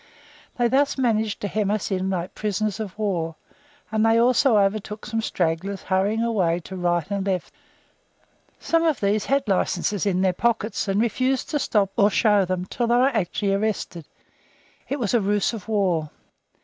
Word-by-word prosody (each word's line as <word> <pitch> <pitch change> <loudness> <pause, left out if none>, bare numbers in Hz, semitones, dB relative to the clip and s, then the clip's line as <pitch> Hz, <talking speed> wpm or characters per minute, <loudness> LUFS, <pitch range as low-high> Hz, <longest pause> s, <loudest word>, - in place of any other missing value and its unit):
They 240 -1 +3
thus 275 +4 +2
managed 220 -5 0
to 205 - -2
hem 205 +1 -1
us 210 0 -1
in 190 0 -1
like 180 -1 -3
prisoners 215 0 -2
of 205 -3 -6
war, 175 -7 -2 0.6
and 220 0 +1
they 225 0 +4
also 245 0 +4
overtook 210 +1 -1
some 225 +1 -2
stragglers 185 0 -2
hurrying 200 +4 +1
away 185 -8 +1
to 190 - -9
right 175 -3 0
and 200 -1 -1
left. 190 -3 -2 1.1
Some 330 0 +1
of 320 -4 +1
these 205 +1 +1
had 275 -2 +1
licenses 195 +1 0
in 185 -2 +1
their 190 -1 +2
pockets, 220 +1 -1
and 195 +1 +1
refused 255 +3 0
to 295 - 0
stop 205 -7 +1
or 205 -2 +5
show 210 -2 +3
them 185 0 -2
until 235 +6 -2
they 235 - +3
were 255 +2 +4
actually 205 -3 -1
arrested. 195 -5 -2 0.8
It 280 - -1
was 230 -3 -1
a 235 - +3
ruse 205 +3 +1
of 220 -4 -7
war. 185 -8 0
205 Hz, 175 wpm, -23 LUFS, 190-225 Hz, 1.1 s, or